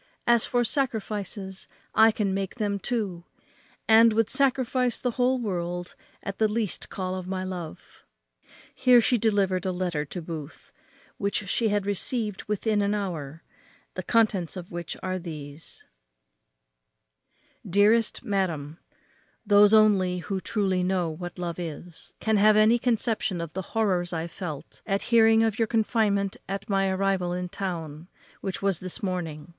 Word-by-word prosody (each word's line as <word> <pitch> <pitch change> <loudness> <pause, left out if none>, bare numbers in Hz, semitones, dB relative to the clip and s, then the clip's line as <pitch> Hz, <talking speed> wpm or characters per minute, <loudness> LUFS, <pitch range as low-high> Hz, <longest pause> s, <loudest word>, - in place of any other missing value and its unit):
As 235 -1 +4
for 245 0 +1
sacrifices, 210 -6 -3 0.3
I 220 +1 +7
can 205 -3 -1
make 195 -1 -3
them 205 -4 -1
too, 200 -7 -3 0.6
and 225 0 +7
would 225 -1 +1
sacrifice 255 -2 +1
the 250 - -1
whole 255 +2 +1
world 175 -5 -3 0.3
at 200 - -5
the 220 - +4
least 210 -2 -2
call 185 -1 -3
of 185 -1 -5
my 185 0 -3
love." 180 -4 -8 0.7
Here 250 -1 +5
she 240 +1 +2
delivered 195 -4 +1
a 190 - -1
letter 180 -4 -2
to 180 - -6
Booth, 160 -3 -8 0.5
which 200 0 -1
she 225 +3 +1
had 205 -1 0
received 210 0 -2
within 210 0 0
an 200 +1 +1
hour, 165 -7 -5 0.5
the - - -4
contents 205 -7 +1
of 175 -1 -8
which 170 -2 -5
were 185 0 -2
these: 155 -3 -8 1.8
"DEAREST 210 +6 +3
MADAM, 170 - -2 0.7
Those 205 0 +6
only 200 -4 +4
who 190 +2 -4
truly 190 -4 0
know 180 -2 0
what 175 +3 -7
love 175 -1 -4
is, 170 0 -8
can 220 -1 +1
have 210 +1 +5
any 220 +3 +5
conception 225 -6 0
of 165 -2 -5
the 190 - -3 0.2
horrors 180 -5 +1
I 165 0 -2
felt 165 -3 -7
at 195 -1 0
hearing 225 -1 +6
of 220 -1 0
your 225 - +2
confinement 210 -3 +1
at 195 0 -4
my 195 0 +2
arrival 190 -2 0
in 180 0 -3
town, 165 -4 -5 0.3
which 195 0 -5
was 195 -4 +1
this 185 +1 -4
morning. 175 -5 -4
195 Hz, 150 wpm, -26 LUFS, 175-220 Hz, 1.8 s, I